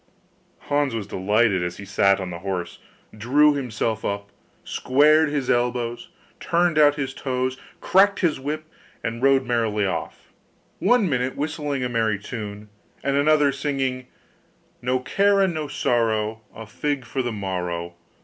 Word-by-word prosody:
Hans 145 -4 0
was 110 -3 -3
delighted 105 +1 +1
as 90 0 -3
he 100 - -8
sat 100 0 +3
on 95 -2 -5
the 85 - -6
horse, 90 -1 -4 0.4
drew 145 +7 +4
himself 115 -5 -2
up, 100 0 -3 0.3
squared 150 +4 +3
his 145 -3 -2
elbows, 120 +5 -1 0.3
turned 170 -2 +1
out 145 -1 +6
his 135 -3 -3
toes, 130 -1 -2 0.2
cracked 200 +1 +4
his 165 -7 +1
whip, 150 +3 -4 0.4
and 115 +1 -3
rode 135 0 +4
merrily 115 -4 0
off, 85 -4 -5 0.5
one 245 -5 +3
minute 130 -3 -1
whistling 145 -2 -2
a - - 0
merry 110 -3 +1
tune, 105 0 -7 0.4
and 140 0 0
another 145 0 +4
singing, 135 -2 -2 0.7
'No 125 +1 0
care 200 +8 +2
and 190 -3 +2
no 155 -2 -3
sorrow, 110 -4 0
A 110 - -8
fig 140 +4 -3
for 130 - -2
the 120 -1 -2
morrow! 90 -4 -4
125 Hz, 150 wpm, -23 LUFS, 105-145 Hz, 0.7 s, out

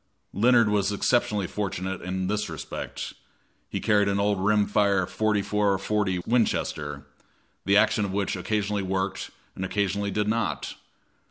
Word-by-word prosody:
Leonard 120 +2 +5
was 105 -1 +1
exceptionally 105 -1 +1
fortunate 95 -1 -3
in 95 +1 -3
this 105 +2 -1
respect; - - -6 0.6
he - - -3
carried 105 -1 +3
an 100 0 +1
old 100 -1 +1
rim 105 0 +3
fire 100 -2 +2
.44 105 -1 +1
40 100 -3 0
Winchester, 75 - 0 0.6
the 100 +1 +4
action 105 0 +3
of 100 - -2
which 100 +1 -1
occasionally 105 +2 -1
worked 95 0 -2 0.3
and 95 - -4
occasionally 100 +1 -1
did 105 +1 -1
not. 115 +1 -1
100 Hz, 140 wpm, -26 LUFS, 95-105 Hz, 0.6 s, Leonard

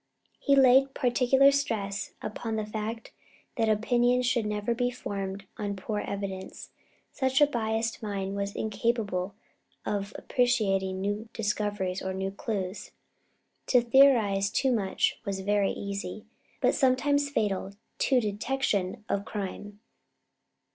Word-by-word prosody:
He 280 - +3
laid 270 0 +5
particular 265 +2 +4
stress 205 -8 -2
upon 220 +1 -4
the 215 -1 -2
fact 215 +2 -5 0.4
that 225 -3 +1
opinions 245 +3 +2
should 240 -3 +1
never 210 +2 -1
be 245 +1 0
formed 195 -5 -5
on 205 -1 -3
poor 210 +2 -3
evidence, 195 -2 -5 0.4
since 265 0 +1
a 295 - +8
biased 225 -4 -2
mind 200 -2 -3
was 200 0 -3
incapable 210 -4 -1 0.5
of 200 0 -2
appreciating 195 -7 +1
new 205 +3 -2
discoveries 205 -3 -1
or 190 0 -3
new 190 0 -2
clues. 200 -1 -4 0.8
To 250 - +5
theorize 235 -6 +4
too 265 +4 +1
much 205 -6 0
was 195 -3 -3
very 205 0 +2
easy, 200 0 -5 0.4
but - - +4
sometimes 285 +2 +2
fatal 200 -7 -1 0.3
to 260 -2 +3
detection 210 -2 -1
of 200 - -1
crime. 205 0 -6
210 Hz, 125 wpm, -28 LUFS, 200-245 Hz, 0.8 s, a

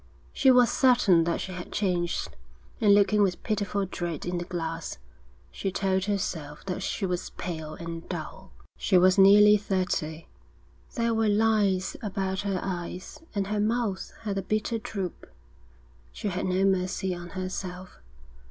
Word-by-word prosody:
She 270 - +4
was 250 -2 +6
certain 235 -10 +4
that 170 - -1
she 190 - -5
had 180 -1 -7
changed, 175 -4 -1 0.5
and 205 -2 +6
looking 205 +1 +4
with 185 -3 +1
pitiful 205 -2 -1
dread 175 -4 -4
in 175 0 -2
the 175 - -4
glass, 165 -2 -4 0.5
she 195 - -3
told 190 0 0
herself 165 -7 -3
that 190 0 -3
she 195 - -2
was 180 -1 -2
pale 160 -3 -6
and 170 0 -7
dull. - - -7 0.3
She 190 - +3
was 185 +2 +5
nearly 210 +2 +8
thirty. 180 -5 -2 0.7
There 230 0 +1
were 220 -1 +2
lines 205 -3 +2
about 190 -2 -2
her 195 -2 -1
eyes, 180 -1 -5 0.2
and 200 -1 0
her 210 +1 -2
mouth 220 -2 -1
had 205 -3 -2
a - - -2
bitter 215 +4 -1
droop. 200 -6 -5 0.8
She 210 - -4
had 185 0 -2
no 185 +1 +2
mercy 185 0 0
on 175 0 -7
herself. 185 0 -5
190 Hz, 150 wpm, -27 LUFS, 180-205 Hz, 0.8 s, nearly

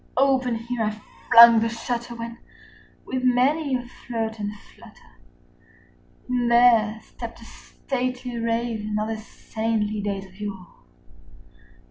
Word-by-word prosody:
Open 260 -2 +2
here 235 +1 -4
I 215 0 -2 0.3
flung 230 0 +9
the 230 +1 0
shutter, 235 +1 -4
when, 230 +1 -7 0.7
with 260 -1 -3
many 265 +3 +2
a 250 - -3
flirt 225 -2 -5
and 205 0 -3
flutter, 210 - -18 1.1
In 250 -1 0
there 235 -2 +4
stepped 235 -1 -9
a 230 - -13
stately 250 -1 -5
Raven 230 -2 -2
of 215 +1 -2
the 225 - -3
saintly 215 -1 -3
days 200 -1 -3
of 190 +1 -18
yore. 195 -4 -6
230 Hz, 125 wpm, -24 LUFS, 215-245 Hz, 1.1 s, flung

